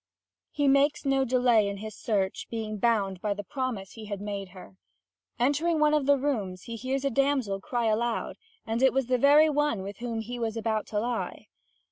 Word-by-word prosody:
He 290 -1 0
makes 280 +2 +3
no 270 -1 +2
delay 245 -4 +3
in 200 0 -4
his 215 0 -7
search, 195 -4 -1
being 215 -2 -4
bound 195 -5 +1
by 205 -1 -1
the 205 - -6
promise 245 -6 -4
he 220 -1 -10
had 205 -2 -5
made 200 -2 -5
her. 185 0 -13 0.6
Entering 300 +6 +1
one 300 0 +4
of 295 -3 +1
the 285 0 +5
rooms, 210 -10 -2
he 230 - -6
hears 260 +4 -2
a 275 - +1
damsel 260 -7 +1
cry 240 +3 -2
aloud, 225 +2 -1 0.3
and 225 +2 -2
it 265 - +5
was 270 -1 +1
the 250 0 +1
very 290 +4 +6
one 295 -9 0
with 200 +1 -7
whom 235 -2 -3
he 240 +2 -6
was 225 -1 -2
about 220 -1 -1
to 210 - -1
lie. 235 +1 -3
235 Hz, 200 wpm, -28 LUFS, 210-270 Hz, 0.6 s, very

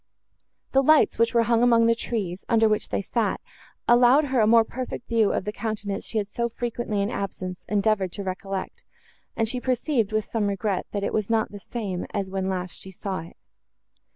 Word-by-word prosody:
The 270 - +4
lights, 310 -1 +4
which 230 +1 +2
were 230 - +5
hung 230 0 +2
among 235 -1 +5
the 230 - +5
trees, 200 -6 -3
under 225 -1 +4
which 215 -1 0
they - - -1
sat, 215 -1 -1 0.5
allowed 245 +5 +6
her 260 -3 0
a 215 - +4
more 230 0 +6
perfect 250 +1 -6
view 225 -3 +3
of - - -2
the 210 - -2
countenance 210 -2 -4
she 225 - -2
had 205 -2 0
so 235 +3 -2
frequently 230 -3 -2
in 205 - -2
absence 185 -3 -5
endeavoured 200 -2 +1
to 200 - -5
recollect, 190 0 -5 0.5
and 225 - +1
she 250 +2 -2
perceived, 250 -3 0
with 215 -1 0
some 220 -3 -1
regret, 200 -1 -1
that 200 -1 -2
it - - -1
was 215 -1 -1
not 225 -1 +1
the 205 - -8
same 195 -5 -4
as 195 -2 -2
when 190 0 -1
last 180 -1 -3
she 190 - -8
saw 190 0 -4
it. 165 +1 -11
215 Hz, 205 wpm, -25 LUFS, 195-235 Hz, 0.5 s, allowed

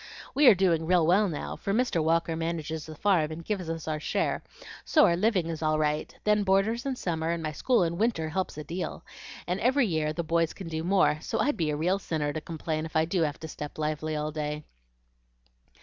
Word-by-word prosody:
We 285 -1 +5
are 220 - +9
doing 170 -4 +2
real 175 -2 +4
well 195 +4 +4
now, 150 - -4
for 195 - -3
Mr. 220 -8 +1
Walker 165 +1 +1
manages 160 -1 -3
the 155 - -8
farm 170 -3 +2
and 160 +1 -7
gives 190 -6 -3
us 165 -1 -4
our 155 -1 -1
share, - - -1 0.4
so 305 - +5
our 170 - +3
living 190 -1 +2
is 165 -1 -4
all 155 -1 +2
right; 150 0 0
then 210 0 +3
boarders 205 +6 +1
in 265 - -1
summer 165 -7 -2
and 170 -1 -1
my 155 - -2
school 235 - +2
in 170 +1 -2
winter 210 -9 +1
helps 185 -1 -3
a 155 - -5
deal, 175 +4 -5 0.4
and 180 +2 -2
every 260 +3 +3
year 155 -5 0
the 170 +2 -3
boys 165 0 +1
can 190 - -8
do 160 0 -3
more, 180 -4 +3
so 225 - -3
I'd 290 - +1
be 160 -3 0
a 150 - 0
real 180 +5 +1
sinner 150 -5 -2
to 155 - -4
complain 160 -1 -3
if 160 - -17
I 160 0 +4
do 170 +1 0
have 150 -2 -1
to 160 - -5
step 150 -1 -7
lively 155 0 -2
all 150 0 -2
day." 150 0 -3
165 Hz, 225 wpm, -28 LUFS, 155-190 Hz, 0.4 s, are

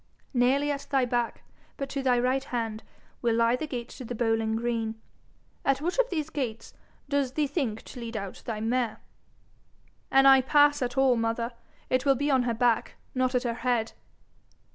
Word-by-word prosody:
Nearly 270 +4 +3
at 280 -1 -4
thy 270 -3 +2
back, 240 -1 -1 0.3
but 275 - -3
to 275 - -3
thy 255 -2 +3
right 255 +2 +1
hand, 225 -3 -3 0.4
will 235 -2 +2
lie 230 +1 +3
the 305 +5 -4
gate 245 -4 -5
to - - -9
the 245 0 -5
bowling 225 -1 +1
green. 225 -1 -2 0.6
At 275 -1 +2
which 350 - -2
of - - +3
these 315 -3 -3
gates 230 -6 -4 0.3
does 280 -2 0
thee 300 +1 +1
think 265 -7 -2
to 250 - -10
lead 230 -1 -5
out 200 -2 -6
thy 215 -2 -3
mare?' 240 +1 0 1.1
'An' 270 0 +5
I 270 -1 +8
pass 290 +2 +4
at 245 0 -2
all, 265 -2 +5
mother, 230 +1 -1 0.3
it 255 0 +1
will 275 -1 +4
be 285 +3 0
on 260 -2 +4
her 230 - 0
back, 235 -1 +1 0.2
not 255 0 +1
at 250 - +2
her 240 -2 -1
head.' 235 -1 -1
250 Hz, 185 wpm, -28 LUFS, 230-270 Hz, 1.1 s, I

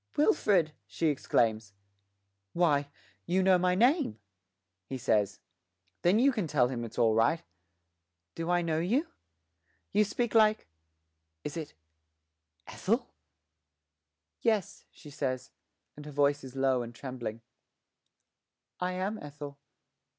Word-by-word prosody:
'Wilfred!' 200 - +3
she 165 - 0
exclaims. 110 -6 +1 0.8
'Why, 145 -5 +2 0.4
you 185 +2 +2
know 185 -1 +5
my 180 0 +2
name!' 240 - +3 0.7
he 135 - -4
says. 105 -4 +1 0.6
'Then 180 +4 +4
you 270 +4 +5
can 215 -9 -2
tell 130 -5 +2
him 120 -2 -3
it's 115 - -8
all 115 -2 +4
right. 115 +9 +2 0.9
Do 165 +1 -4
I 175 0 +2
know 160 -1 0
you? 235 - +1 0.9
You 210 +2 +4
speak 230 +2 -2
like 215 -1 +4 0.8
is 150 - -5
it 160 - -6 0.9
Ethel?' - - -1 1.3
'Yes,' 215 -5 0
she 150 - -14
says, 130 -3 -3 0.4
and 150 - -10
her - - -7
voice 145 0 +2
is 130 0 -10
low 135 -2 +2
and 120 0 -7
trembling, 120 -4 -6 1.4
'I 180 0 -1
am 190 +4 -2
Ethel.' 145 -1 -9
150 Hz, 120 wpm, -30 LUFS, 130-185 Hz, 1.4 s, know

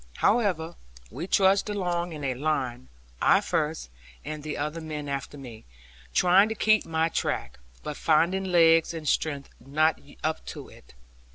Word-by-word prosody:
However, 180 -8 +1 0.3
we 155 +9 -6
trudged 195 +1 +3
along 175 -4 -2
in 150 -2 -7
a 135 -2 0
line; 130 - -2 0.3
I - - +5
first, - - -2 0.3
and 155 0 -5
the 150 0 -5
other 150 +3 -3
men 150 -2 -6
after 140 +1 -4
me; 120 -5 -10 0.5
trying 185 +4 +5
to 220 - -3
keep 215 0 +3
my 160 0 +1
track, 165 - -3 0.2
but 150 - -5
finding 170 +5 +2
legs 165 -2 +4
and 155 -2 -6
strength 140 -1 -1
not 155 +3 +1 0.2
up 160 0 -1
to - - -8
it. - - -18
160 Hz, 155 wpm, -27 LUFS, 145-175 Hz, 0.5 s, I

